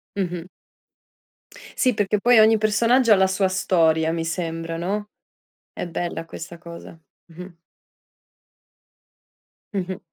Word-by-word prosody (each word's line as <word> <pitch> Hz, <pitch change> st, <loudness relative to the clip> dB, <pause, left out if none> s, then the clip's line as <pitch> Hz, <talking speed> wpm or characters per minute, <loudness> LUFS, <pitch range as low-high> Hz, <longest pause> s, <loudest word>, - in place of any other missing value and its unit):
Mh-mh. 180 Hz, -2 st, -4 dB, 1.3 s
Sì, 255 Hz, -2 st, +2 dB
perché 205 Hz, 0 st, 0 dB
poi 240 Hz, +1 st, +5 dB
ogni 220 Hz, 0 st, +6 dB
personaggio 230 Hz, +3 st, +2 dB
ha -, -, +6 dB
la 190 Hz, 0 st, +3 dB
sua 190 Hz, 0 st, +1 dB
storia, 165 Hz, -4 st, +2 dB
mi 165 Hz, -1 st, -3 dB
sembra, 165 Hz, -1 st, -4 dB
no? 205 Hz, +4 st, -3 dB, 0.6 s
È -, -, -5 dB
bella 170 Hz, -1 st, -4 dB
questa 170 Hz, +1 st, -9 dB
cosa. 170 Hz, -1 st, -11 dB, 0.3 s
Mh-mh. 180 Hz, 0 st, -11 dB, 2.2 s
Mh-mh. 185 Hz, -1 st, -3 dB
185 Hz, 115 wpm, -22 LUFS, 165-210 Hz, 2.2 s, ogni